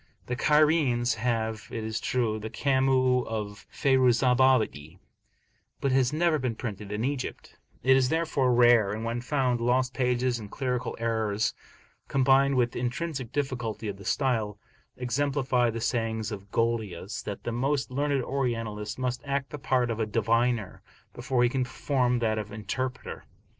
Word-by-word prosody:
The 125 Hz, -, -2 dB
Cairenes 150 Hz, -4 st, +3 dB
have, 110 Hz, -2 st, -2 dB
it 115 Hz, -, -4 dB
is 110 Hz, 0 st, -3 dB
true, 115 Hz, -4 st, 0 dB
the 110 Hz, +1 st, -6 dB
Kamus 130 Hz, -2 st, +2 dB
of 105 Hz, -2 st, -5 dB
Fayruzabadi, 125 Hz, -, +3 dB, 0.8 s
but 140 Hz, -, 0 dB
it -, -, +2 dB
has 130 Hz, -2 st, +3 dB
never 160 Hz, 0 st, +2 dB
been 125 Hz, -4 st, -2 dB
printed 105 Hz, -3 st, -6 dB
in 105 Hz, +3 st, -1 dB
Egypt; 135 Hz, -1 st, -4 dB, 0.3 s
it 130 Hz, +2 st, +6 dB
is 130 Hz, -1 st, +3 dB
therefore 155 Hz, -5 st, +1 dB
rare, 120 Hz, -4 st, +5 dB
and 110 Hz, +2 st, -4 dB
when 115 Hz, +1 st, -2 dB
found, 125 Hz, -2 st, 0 dB
lost 125 Hz, +2 st, +1 dB
pages 125 Hz, -1 st, 0 dB
and 105 Hz, -2 st, -9 dB
clerical 125 Hz, 0 st, -3 dB
errors 110 Hz, -2 st, 0 dB, 0.5 s
combined 135 Hz, +1 st, +3 dB
with 120 Hz, -1 st, +2 dB
the -, -, -5 dB
intrinsic 130 Hz, 0 st, -3 dB
difficulty 120 Hz, -6 st, -3 dB
of 100 Hz, -1 st, -4 dB
the 100 Hz, -, -12 dB
style, 110 Hz, -4 st, 0 dB, 0.4 s
exemplify 130 Hz, -1 st, +1 dB
the 115 Hz, 0 st, -3 dB
saying 115 Hz, -2 st, -1 dB
of 100 Hz, -1 st, -7 dB
Golius, 110 Hz, -5 st, -2 dB
that 100 Hz, -, -6 dB
the 120 Hz, -, -3 dB
most 135 Hz, +3 st, -1 dB
learned 140 Hz, 0 st, 0 dB
Orientalist 115 Hz, -6 st, -2 dB
must 125 Hz, -1 st, -2 dB
act 140 Hz, -1 st, -2 dB
the 150 Hz, -, -6 dB
part 125 Hz, -2 st, +1 dB
of 115 Hz, -, -3 dB
a 110 Hz, -, 0 dB
diviner, 115 Hz, 0 st, 0 dB, 0.3 s
before 125 Hz, -2 st, 0 dB
he 120 Hz, -, +4 dB
can 130 Hz, +1 st, 0 dB
perform 125 Hz, 0 st, 0 dB
that 110 Hz, -2 st, 0 dB
of 105 Hz, -1 st, -6 dB
interpreter. 120 Hz, +5 st, -4 dB
125 Hz, 160 wpm, -27 LUFS, 110-130 Hz, 0.8 s, it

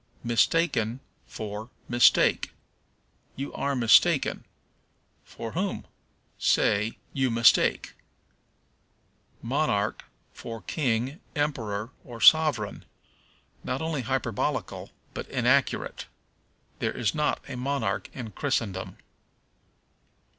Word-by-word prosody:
Mistaken 120 Hz, -1 st, +1 dB, 0.3 s
for 110 Hz, +1 st, -6 dB, 0.2 s
Mistake. 120 Hz, 0 st, +4 dB, 0.8 s
"You 140 Hz, +2 st, -5 dB
are 140 Hz, 0 st, -1 dB
mistaken." 115 Hz, -3 st, +4 dB, 0.8 s
For 115 Hz, -1 st, -8 dB
whom? 190 Hz, +3 st, -2 dB, 0.5 s
Say, 105 Hz, +2 st, +2 dB, 0.2 s
You 130 Hz, -2 st, +1 dB
mistake. 115 Hz, 0 st, +3 dB, 1.5 s
Monarch -, -, 0 dB, 0.3 s
for 115 Hz, -3 st, -8 dB
King, 130 Hz, -, -1 dB, 0.2 s
Emperor, 115 Hz, -7 st, -2 dB
or 120 Hz, -2 st, -10 dB
Sovereign. 145 Hz, -7 st, +4 dB, 0.8 s
Not 125 Hz, -, -2 dB
only 160 Hz, -4 st, -1 dB
hyperbolical, 125 Hz, -3 st, -2 dB, 0.2 s
but -, -, -6 dB
inaccurate. -, -, +1 dB, 0.7 s
There -, -, -2 dB
is 115 Hz, -, 0 dB
not 150 Hz, -1 st, 0 dB
a 135 Hz, -, -6 dB
monarch 125 Hz, -6 st, -2 dB
in 115 Hz, -4 st, -7 dB
Christendom. 110 Hz, -7 st, -2 dB
120 Hz, 85 wpm, -27 LUFS, 110-140 Hz, 1.5 s, Mistake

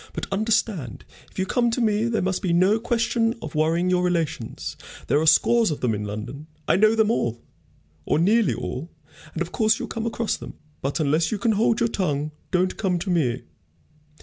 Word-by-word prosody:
But -, -, -4 dB
understand, 210 Hz, -, -1 dB, 0.2 s
if -, -, -21 dB
you 190 Hz, -, 0 dB
come 240 Hz, +4 st, +1 dB
to 235 Hz, -, -1 dB
me, 215 Hz, -1 st, +2 dB
there 230 Hz, -4 st, 0 dB
must 190 Hz, 0 st, -1 dB
be 175 Hz, -3 st, 0 dB
no 190 Hz, +5 st, +4 dB
question 230 Hz, 0 st, 0 dB
of 225 Hz, -, -7 dB
worrying 165 Hz, +4 st, +1 dB
your 180 Hz, 0 st, +2 dB
relations. 165 Hz, -9 st, -2 dB, 0.3 s
There 145 Hz, -, +2 dB
are 160 Hz, -, 0 dB
scores 230 Hz, +7 st, +5 dB
of 150 Hz, -, -4 dB
them 120 Hz, -3 st, +1 dB
in 105 Hz, 0 st, -3 dB
London. 120 Hz, +9 st, -6 dB, 0.2 s
I -, -, +4 dB
know 215 Hz, +4 st, +4 dB
them 220 Hz, -1 st, +3 dB
all, 120 Hz, -, -1 dB, 0.6 s
or -, -, +1 dB
nearly 190 Hz, -, +3 dB
all, 125 Hz, -, -5 dB, 0.4 s
and -, -, -1 dB
of -, -, -10 dB
course 220 Hz, -2 st, +2 dB
you'll -, -, -5 dB
come 225 Hz, 0 st, -3 dB
across 230 Hz, -1 st, -1 dB
them. -, -, -10 dB, 0.3 s
But 140 Hz, +5 st, -2 dB
unless 155 Hz, +4 st, +1 dB
you 215 Hz, -, 0 dB
can 230 Hz, +3 st, +1 dB
hold 220 Hz, +1 st, +2 dB
your 235 Hz, -, +2 dB
tongue, 150 Hz, -8 st, -2 dB, 0.2 s
don't 185 Hz, 0 st, 0 dB
come 185 Hz, -4 st, 0 dB
to 185 Hz, +2 st, -3 dB
me. 130 Hz, -8 st, 0 dB
185 Hz, 205 wpm, -24 LUFS, 155-225 Hz, 0.6 s, scores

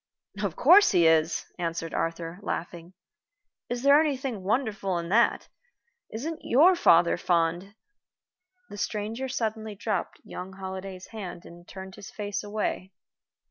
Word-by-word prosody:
"Of -, -, -2 dB
course 410 Hz, -5 st, +7 dB
he 170 Hz, -, +4 dB
is," 160 Hz, 0 st, +3 dB
answered 165 Hz, -1 st, -3 dB
Arthur, 165 Hz, +1 st, -3 dB
laughing. 175 Hz, -2 st, -5 dB, 0.8 s
"Is 245 Hz, +1 st, -3 dB
there 280 Hz, +2 st, +7 dB
anything 270 Hz, -8 st, -2 dB
wonderful 205 Hz, -3 st, -1 dB
in 170 Hz, 0 st, -4 dB
that? 230 Hz, +4 st, +3 dB, 0.6 s
Isn't 305 Hz, +9 st, -4 dB
your 330 Hz, +9 st, +5 dB
father 170 Hz, -, +4 dB
fond 175 Hz, +3 st, 0 dB, 0.5 s
" 365 Hz, 0 st, -47 dB
The 205 Hz, -, -8 dB
stranger 220 Hz, +5 st, -3 dB
suddenly 220 Hz, -4 st, -3 dB
dropped 215 Hz, +2 st, -3 dB
young 185 Hz, +1 st, -8 dB
Holliday's 190 Hz, -1 st, -7 dB
hand 190 Hz, -6 st, -8 dB
and 175 Hz, 0 st, -14 dB
turned 190 Hz, 0 st, -10 dB
his 205 Hz, -, -10 dB
face 205 Hz, -1 st, -4 dB
away. 205 Hz, -2 st, -3 dB
200 Hz, 135 wpm, -27 LUFS, 175-235 Hz, 0.8 s, course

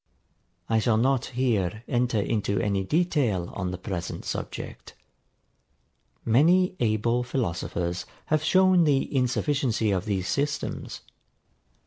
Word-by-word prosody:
I 115 Hz, -1 st, +2 dB
shall 110 Hz, 0 st, +2 dB
not 130 Hz, +2 st, +2 dB
here 110 Hz, -5 st, -1 dB
enter 120 Hz, -3 st, +1 dB
into 100 Hz, -1 st, 0 dB
any 100 Hz, 0 st, 0 dB
detail 135 Hz, -, 0 dB
on 95 Hz, -2 st, -3 dB
the 90 Hz, -, -4 dB
present 90 Hz, -2 st, -5 dB
subject. -, -, -6 dB, 1.3 s
Many 175 Hz, +11 st, +4 dB
able 115 Hz, +1 st, +1 dB
philosophers 90 Hz, -7 st, -2 dB, 0.2 s
have 155 Hz, 0 st, +1 dB
shown 185 Hz, +1 st, +4 dB
the 140 Hz, -1 st, +1 dB
insufficiency 125 Hz, -3 st, +1 dB
of 95 Hz, -1 st, -1 dB
these 95 Hz, -4 st, -1 dB
systems. 145 Hz, +8 st, -2 dB
115 Hz, 110 wpm, -26 LUFS, 100-140 Hz, 1.3 s, Many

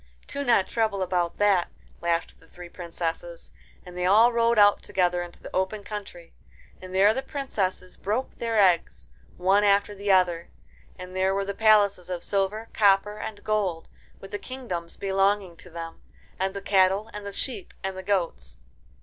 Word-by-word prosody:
"Do 280 Hz, -, -4 dB
not 235 Hz, -7 st, +3 dB
trouble 220 Hz, -4 st, 0 dB
about 175 Hz, -2 st, -1 dB
that," 200 Hz, -4 st, +3 dB, 0.3 s
laughed 170 Hz, 0 st, -1 dB
the 165 Hz, -, -21 dB
three 175 Hz, +1 st, -11 dB
princesses, 170 Hz, -1 st, -5 dB, 0.3 s
and 180 Hz, -1 st, -11 dB
they 180 Hz, 0 st, 0 dB
all 225 Hz, +5 st, +6 dB
rode 235 Hz, 0 st, +2 dB
out 205 Hz, -1 st, +6 dB
together 180 Hz, -1 st, 0 dB
into 175 Hz, -1 st, -10 dB
the -, -, -8 dB
open 190 Hz, +3 st, -1 dB
country, 200 Hz, -5 st, -8 dB, 0.5 s
and 185 Hz, 0 st, -9 dB
there 195 Hz, +3 st, +5 dB
the 265 Hz, -, -2 dB
princesses 210 Hz, -10 st, -3 dB
broke 220 Hz, +7 st, -2 dB
their 230 Hz, -1 st, -1 dB
eggs, 180 Hz, -4 st, +2 dB, 0.3 s
one 195 Hz, +3 st, +3 dB
after 205 Hz, 0 st, +3 dB
the 200 Hz, 0 st, -1 dB
other, 180 Hz, -3 st, +2 dB, 0.5 s
and 185 Hz, 0 st, -9 dB
there 190 Hz, +1 st, +1 dB
were 195 Hz, 0 st, -1 dB
the 200 Hz, -, -3 dB
palaces 200 Hz, -4 st, +3 dB
of 180 Hz, -2 st, -4 dB
silver, 205 Hz, +3 st, -1 dB
copper, 205 Hz, 0 st, +3 dB
and 205 Hz, -2 st, -7 dB
gold, 195 Hz, -6 st, -1 dB, 0.3 s
with 195 Hz, -, -12 dB
the 205 Hz, -, -4 dB
kingdoms 185 Hz, -11 st, -6 dB
belonging 195 Hz, -1 st, +1 dB
to 180 Hz, -, -13 dB
them, 165 Hz, -1 st, -8 dB, 0.4 s
and 190 Hz, +1 st, -1 dB
the 200 Hz, -, -4 dB
cattle 195 Hz, +2 st, +3 dB
and 210 Hz, 0 st, -7 dB
the 200 Hz, -, -6 dB
sheep 270 Hz, -, -5 dB
and 190 Hz, 0 st, -3 dB
the 190 Hz, -, -6 dB
goats. 190 Hz, -3 st, -2 dB
195 Hz, 175 wpm, -26 LUFS, 180-210 Hz, 0.5 s, all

